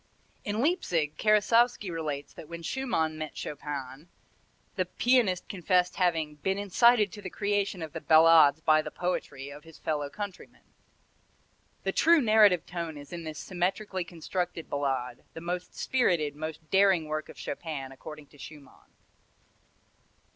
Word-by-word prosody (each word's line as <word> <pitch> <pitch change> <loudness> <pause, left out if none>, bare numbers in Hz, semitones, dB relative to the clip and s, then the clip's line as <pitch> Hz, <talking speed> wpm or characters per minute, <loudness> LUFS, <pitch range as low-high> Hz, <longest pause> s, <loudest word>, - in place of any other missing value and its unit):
In 210 +2 -2
Leipzig, 175 - 0
Karasowski 215 -1 +3
relates, 150 -4 -4
that 155 - -11
when 170 0 -7
Schumann 160 -10 -1
met 155 -1 -6
Chopin, 145 0 -6 0.7
the 185 -3 0
pianist 225 -2 +2
confessed 180 -1 +1
having 160 -5 0
"been 190 +6 -1
incited 210 +1 +4
to 205 - -9
the 190 - -6
creation 200 -3 -1
of 160 -1 -7
the 165 - -5
ballades 160 -2 +6
by 155 -1 +4
the - - -6
poetry" 140 -6 -4
of 145 +1 -11
his 165 -1 -15
fellow 145 -2 -2
countryman. 205 +2 -8 1.2
The - - 0
true 335 0 +5
narrative 215 - +5
tone 170 -3 -5
is 145 +3 -11
in 170 -1 -6
this 155 -1 -6
symmetrically 185 +1 -2
constructed 175 0 -4
Ballade, 135 -4 -2
the 165 - -7
most 175 +1 -4
spirited, 170 - +1
most 155 +1 -6
daring 195 -4 +4
work 155 0 -4
of - - -12
Chopin, 145 -3 -5
according 150 +2 -10
to 145 - -20
Schumann. 145 -1 -13
170 Hz, 145 wpm, -28 LUFS, 150-200 Hz, 1.2 s, ballades